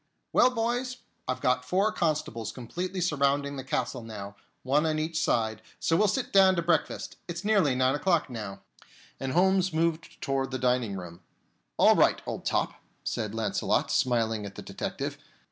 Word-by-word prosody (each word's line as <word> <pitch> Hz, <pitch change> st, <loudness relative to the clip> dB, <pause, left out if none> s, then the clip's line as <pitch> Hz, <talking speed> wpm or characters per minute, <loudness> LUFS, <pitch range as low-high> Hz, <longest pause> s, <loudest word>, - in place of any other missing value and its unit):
"Well, 250 Hz, -, +6 dB
boys, 245 Hz, +1 st, -1 dB, 0.3 s
I've 130 Hz, -, -2 dB
got 125 Hz, 0 st, +2 dB
four 195 Hz, +10 st, +2 dB
constables 150 Hz, -, -1 dB
completely 180 Hz, +11 st, -4 dB
surrounding 140 Hz, -3 st, +1 dB
the 135 Hz, -, -5 dB
castle 130 Hz, -1 st, -2 dB
now, 105 Hz, -3 st, -8 dB, 0.3 s
one 145 Hz, +5 st, +2 dB
on 155 Hz, -1 st, 0 dB
each 160 Hz, +1 st, -1 dB
side, 110 Hz, -2 st, +1 dB, 0.2 s
so 165 Hz, -, +2 dB
we'll 210 Hz, +4 st, +4 dB
sit 240 Hz, +6 st, -1 dB
down 190 Hz, -1 st, +7 dB
to 170 Hz, -, 0 dB
breakfast. 165 Hz, -2 st, 0 dB
It's 170 Hz, +2 st, -5 dB
nearly 195 Hz, -11 st, +3 dB
nine 130 Hz, +1 st, +3 dB
o'clock 170 Hz, +1 st, +2 dB
now." 105 Hz, -6 st, -6 dB, 0.6 s
And 135 Hz, -1 st, -3 dB
Holmes 190 Hz, +1 st, +3 dB
moved 165 Hz, 0 st, -1 dB
toward 135 Hz, -2 st, -1 dB
the 130 Hz, -, -3 dB
dining 125 Hz, -4 st, +1 dB
room. 85 Hz, -2 st, -8 dB, 0.6 s
"All -, -, +6 dB
right, -, -, +4 dB
old -, -, -5 dB
top," -, -, -1 dB, 0.2 s
said 110 Hz, -2 st, -3 dB
Launcelot, 105 Hz, -3 st, 0 dB
smiling 115 Hz, -4 st, +1 dB
at 100 Hz, -1 st, -8 dB
the -, -, -8 dB
detective. -, -, -4 dB
140 Hz, 165 wpm, -28 LUFS, 115-180 Hz, 0.6 s, down